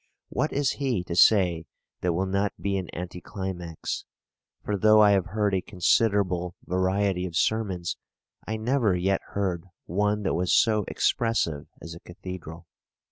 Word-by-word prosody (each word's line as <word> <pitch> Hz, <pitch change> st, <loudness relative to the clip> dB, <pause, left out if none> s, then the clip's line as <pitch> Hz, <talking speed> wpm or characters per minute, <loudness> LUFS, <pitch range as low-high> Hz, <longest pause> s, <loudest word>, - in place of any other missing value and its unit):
What 150 Hz, +5 st, -1 dB
is 140 Hz, -1 st, +1 dB
he 130 Hz, -10 st, -1 dB
to 85 Hz, -, -5 dB
say 90 Hz, -5 st, +4 dB, 0.4 s
that 90 Hz, -1 st, +1 dB
will 95 Hz, +3 st, 0 dB
not 100 Hz, +1 st, 0 dB
be 100 Hz, 0 st, -1 dB
an 95 Hz, -3 st, -3 dB
anti 90 Hz, +1 st, -6 dB
climax? 90 Hz, -4 st, -5 dB, 0.6 s
For 105 Hz, -, 0 dB
though 110 Hz, +2 st, +5 dB
I 105 Hz, -1 st, +7 dB
have 95 Hz, -3 st, +2 dB
heard 105 Hz, 0 st, 0 dB
a 95 Hz, -, +1 dB
considerable 90 Hz, -2 st, +1 dB
variety 95 Hz, 0 st, 0 dB
of 85 Hz, -, -9 dB
sermons, 95 Hz, -4 st, 0 dB, 0.5 s
I 110 Hz, +1 st, -2 dB
never 115 Hz, -3 st, +1 dB
yet 95 Hz, +2 st, +1 dB
heard 95 Hz, -4 st, -1 dB, 0.2 s
one 105 Hz, +3 st, 0 dB
that 95 Hz, -, 0 dB
was 90 Hz, +2 st, 0 dB
so 105 Hz, -3 st, +3 dB
expressive 115 Hz, -11 st, 0 dB, 0.2 s
as 85 Hz, -, -7 dB
a 85 Hz, -, -10 dB
cathedral. 85 Hz, -2 st, -9 dB
95 Hz, 155 wpm, -26 LUFS, 90-105 Hz, 0.6 s, I